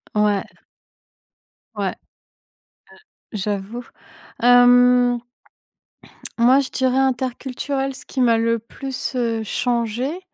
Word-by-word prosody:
Ouais. 210 Hz, -2 st, +2 dB, 1.3 s
Ouais. -, -, -1 dB, 1.4 s
Heu, -, -, -3 dB
j'avoue, 205 Hz, +4 st, -4 dB, 0.6 s
hem 245 Hz, 0 st, +5 dB, 1.2 s
moi 250 Hz, +3 st, +5 dB
je 270 Hz, -2 st, -2 dB
dirais 260 Hz, 0 st, 0 dB
interculturel, 265 Hz, +1 st, -2 dB
ce -, -, -11 dB
qui 265 Hz, -, -3 dB
m'a 230 Hz, -2 st, +4 dB
le 230 Hz, 0 st, +1 dB
plus, 265 Hz, +4 st, -6 dB
heu, 230 Hz, -2 st, -1 dB
changée. 240 Hz, -, -2 dB
245 Hz, 95 wpm, -21 LUFS, 230-260 Hz, 1.4 s, hem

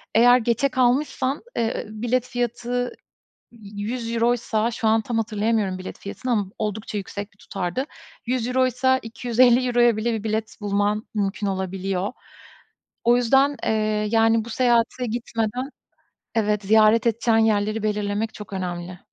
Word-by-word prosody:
eğer 245 Hz, +2 st, +7 dB
geçe 235 Hz, +4 st, +1 dB
kalmışsan, 260 Hz, +2 st, +1 dB, 0.2 s
eee, 230 Hz, 0 st, -1 dB
bilet 240 Hz, +3 st, -1 dB
fiyatı 245 Hz, 0 st, -2 dB, 0.6 s
€100'ysa 230 Hz, +1 st, -1 dB
şu 230 Hz, -1 st, -1 dB
an 220 Hz, +1 st, +4 dB
tam 235 Hz, +2 st, -3 dB
hatırlayamıyorum 215 Hz, -3 st, 0 dB
bilet 185 Hz, -, -8 dB
fiyatını 245 Hz, +5 st, -4 dB
ama 210 Hz, -4 st, +1 dB
oldukça 210 Hz, 0 st, -3 dB
yüksek 200 Hz, +1 st, -6 dB
bir 195 Hz, -, -30 dB
tutardı. 190 Hz, +7 st, -3 dB, 0.4 s
€100'ysa 255 Hz, +1 st, +1 dB
€250'ya 240 Hz, 0 st, +3 dB
bile 230 Hz, +2 st, 0 dB
bir 220 Hz, -1 st, -4 dB
bilet 220 Hz, 0 st, -2 dB
bulman 205 Hz, +1 st, 0 dB
mümkün 205 Hz, 0 st, -1 dB
olabiliyor. 190 Hz, +1 st, -2 dB, 0.9 s
O 240 Hz, +1 st, +5 dB
yüzden, 270 Hz, +4 st, +3 dB
eee, 215 Hz, -1 st, 0 dB
yani, 225 Hz, 0 st, +3 dB
bu 235 Hz, -, -9 dB
seyahate 240 Hz, +1 st, +2 dB
gitmeden, 235 Hz, +2 st, -3 dB, 0.7 s
evet, 210 Hz, -2 st, +1 dB
ziyaret 215 Hz, +2 st, +5 dB
edeceğin 230 Hz, 0 st, +2 dB
yerleri 215 Hz, -1 st, +1 dB
belirlemek 210 Hz, +1 st, -1 dB
çok 210 Hz, -1 st, -10 dB
önemli. 180 Hz, -1 st, -5 dB
225 Hz, 125 wpm, -23 LUFS, 210-240 Hz, 0.9 s, eğer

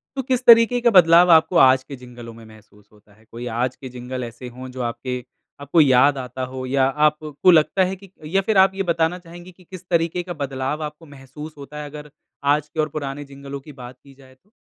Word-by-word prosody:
तो 270 Hz, -, -2 dB
किस 255 Hz, -2 st, 0 dB
तरीके 235 Hz, +1 st, +6 dB
का 235 Hz, -, +4 dB
बदलाव 175 Hz, -2 st, +6 dB
आपको 165 Hz, +2 st, +4 dB
आज 130 Hz, 0 st, +5 dB
के 140 Hz, -, -9 dB
जिंगलों 120 Hz, -2 st, -12 dB
में 115 Hz, 0 st, -14 dB
महसूस 105 Hz, -1 st, -19 dB
होता 105 Hz, 0 st, -24 dB
है? 110 Hz, +2 st, -25 dB
कोई 120 Hz, +1 st, -8 dB
आज 125 Hz, +1 st, -1 dB
के 130 Hz, -, -10 dB
जिंगल 125 Hz, +1 st, -7 dB
ऐसे 120 Hz, +2 st, -9 dB
हो 130 Hz, +1 st, -9 dB
जो 130 Hz, 0 st, -7 dB
आपके 125 Hz, +1 st, -4 dB, 0.4 s
आपको 145 Hz, +4 st, +2 dB
याद 135 Hz, 0 st, +4 dB
आता 130 Hz, 0 st, -6 dB
हो 130 Hz, 0 st, -5 dB
या 135 Hz, +1 st, 0 dB, 0.2 s
आपको 150 Hz, +3 st, +2 dB
लगता 170 Hz, +3 st, +3 dB
है 190 Hz, -, -4 dB
कि 195 Hz, +1 st, -17 dB, 0.3 s
या 195 Hz, -, +4 dB
फिर 205 Hz, +1 st, -1 dB
आप 190 Hz, 0 st, +5 dB
ये 195 Hz, -, -2 dB
बताना 165 Hz, +1 st, 0 dB
चाहेंगी 175 Hz, +1 st, -13 dB
कि 180 Hz, +1 st, -22 dB
किस 185 Hz, 0 st, -12 dB
तरीके 170 Hz, +1 st, 0 dB
का 175 Hz, 0 st, -6 dB
बदलाव 140 Hz, 0 st, -4 dB
आपको 150 Hz, +2 st, -8 dB
महसूस 145 Hz, +2 st, -11 dB
होता 140 Hz, +1 st, -11 dB
है 145 Hz, -, -8 dB
अगर, 150 Hz, 0 st, -11 dB, 0.3 s
आज 145 Hz, +1 st, +1 dB
के 160 Hz, -, -9 dB
और 155 Hz, 0 st, +1 dB
पुराने 145 Hz, -1 st, -6 dB
जिंगलों 140 Hz, 0 st, -8 dB
की 150 Hz, -, -13 dB
बात 125 Hz, +1 st, -10 dB
की 140 Hz, -1 st, -17 dB
जाए 130 Hz, -1 st, -20 dB
तो? 190 Hz, +10 st, -38 dB
145 Hz, 230 wpm, -21 LUFS, 130-170 Hz, 0.4 s, तरीके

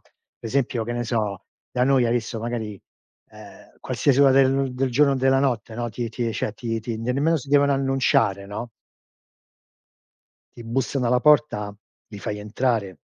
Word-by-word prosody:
Per -, -, -16 dB
esempio 130 Hz, -2 st, 0 dB
che 120 Hz, -, -5 dB
ne 120 Hz, 0 st, -2 dB
so, 105 Hz, -5 st, -2 dB, 0.3 s
da 125 Hz, 0 st, +1 dB
noi 135 Hz, -2 st, +3 dB
hai 115 Hz, -, +1 dB
visto 115 Hz, -1 st, -2 dB
magari, 110 Hz, -4 st, -4 dB, 0.5 s
ehm, -, -, -15 dB
qualsiasi 140 Hz, -2 st, +1 dB
ora 135 Hz, -1 st, +6 dB
de 135 Hz, 0 st, +3 dB
del 130 Hz, 0 st, -1 dB
giorno 140 Hz, +2 st, +4 dB
o -, -, +1 dB
della 135 Hz, 0 st, +3 dB
notte, 120 Hz, -4 st, -1 dB
no, 120 Hz, 0 st, -2 dB
ti 115 Hz, +1 st, -4 dB
ti 115 Hz, 0 st, -3 dB
cioè 105 Hz, -, -2 dB
ti 115 Hz, 0 st, -4 dB
ti 115 Hz, 0 st, -4 dB
nemmeno 140 Hz, +8 st, +1 dB
si 140 Hz, -1 st, -7 dB
devono 140 Hz, 0 st, +4 dB
annunciare, 135 Hz, -7 st, +1 dB
no? 110 Hz, +4 st, -6 dB, 1.9 s
Ti 120 Hz, -, -10 dB
bussano 125 Hz, +2 st, -1 dB
alla 125 Hz, +1 st, +2 dB
porta, 145 Hz, -9 st, +3 dB, 0.4 s
li 105 Hz, -, -9 dB
fai 105 Hz, +1 st, -4 dB
entrare. 105 Hz, -4 st, -1 dB
120 Hz, 170 wpm, -23 LUFS, 110-135 Hz, 1.9 s, ora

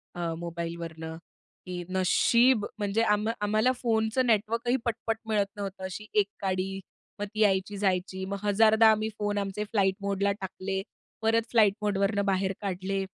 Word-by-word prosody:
अ, 170 Hz, -2 st, -2 dB
मोबाईलवरनं, 165 Hz, -1 st, -5 dB, 0.5 s
की 180 Hz, -1 st, -5 dB
नशीब 215 Hz, +5 st, +3 dB
म्हणजे 205 Hz, +2 st, +1 dB
आम्हा 215 Hz, +1 st, +1 dB
आम्हाला 215 Hz, +4 st, +2 dB
फोनचं 225 Hz, +1 st, +1 dB
नेटवर्कही 230 Hz, +2 st, +1 dB
पटपट 225 Hz, -1 st, -1 dB
मिळत 210 Hz, -2 st, +2 dB
नव्हतं. 195 Hz, -2 st, -6 dB
अशी 190 Hz, +3 st, -6 dB
1 200 Hz, -, +3 dB
काडी 195 Hz, 0 st, -1 dB, 0.4 s
मग 205 Hz, -, -1 dB
ती 215 Hz, -, -5 dB
यायची 200 Hz, 0 st, +2 dB
जायची. 190 Hz, -1 st, -1 dB
मग 200 Hz, +1 st, -3 dB
1000 215 Hz, +2 st, +4 dB
दा 225 Hz, -, +8 dB
आम्ही 215 Hz, 0 st, 0 dB
फोन 205 Hz, 0 st, -1 dB
आमचे 200 Hz, +1 st, -2 dB
फ्लाइट 195 Hz, -3 st, +2 dB
मोडला 200 Hz, 0 st, 0 dB
टाकले. 190 Hz, 0 st, -3 dB, 0.4 s
परत 225 Hz, +1 st, +1 dB
फ्लाइट 215 Hz, -4 st, +5 dB
मोडवरनं 200 Hz, 0 st, +1 dB
बाहेर 195 Hz, 0 st, +1 dB
काढले. 195 Hz, 0 st, -2 dB
200 Hz, 150 wpm, -28 LUFS, 190-220 Hz, 0.5 s, दा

